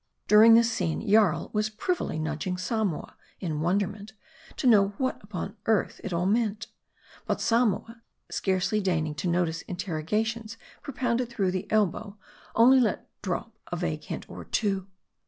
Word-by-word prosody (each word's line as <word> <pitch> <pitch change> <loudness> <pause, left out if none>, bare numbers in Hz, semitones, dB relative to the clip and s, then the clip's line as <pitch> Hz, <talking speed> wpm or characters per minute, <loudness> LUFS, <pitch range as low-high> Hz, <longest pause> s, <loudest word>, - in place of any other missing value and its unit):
During 220 +2 +8
this 230 +1 +4
scene, 220 -1 -2
Jarl 205 -5 +3
was 215 0 +1
privily 220 - -2
nudging 155 +3 -2
Samoa, 190 -2 -2 0.2
in 155 -5 -3
wonderment, 200 +4 -1 0.4
to - - -3
know 205 -4 +5
what 260 -4 -2
upon 200 +1 -6
earth 220 -2 +1
it 200 - -4
all 170 +1 0
meant. 215 0 +1 0.6
But - - 0
Samoa, 230 0 +1 0.3
scarcely 190 +2 0
deigning 160 -5 0
to 165 - -4
notice 170 -2 0
interrogatories 215 +6 -3 0.2
propounded 245 -3 -1
through 200 -6 0
the 185 +2 -4
elbow, 210 0 0 0.4
only 255 +4 +7
let 235 -4 0
drop - - -4 0.2
a - - -1
vague - - -3
hint - - -6
or - - -9
two. 195 -3 -1
205 Hz, 145 wpm, -27 LUFS, 180-225 Hz, 0.6 s, During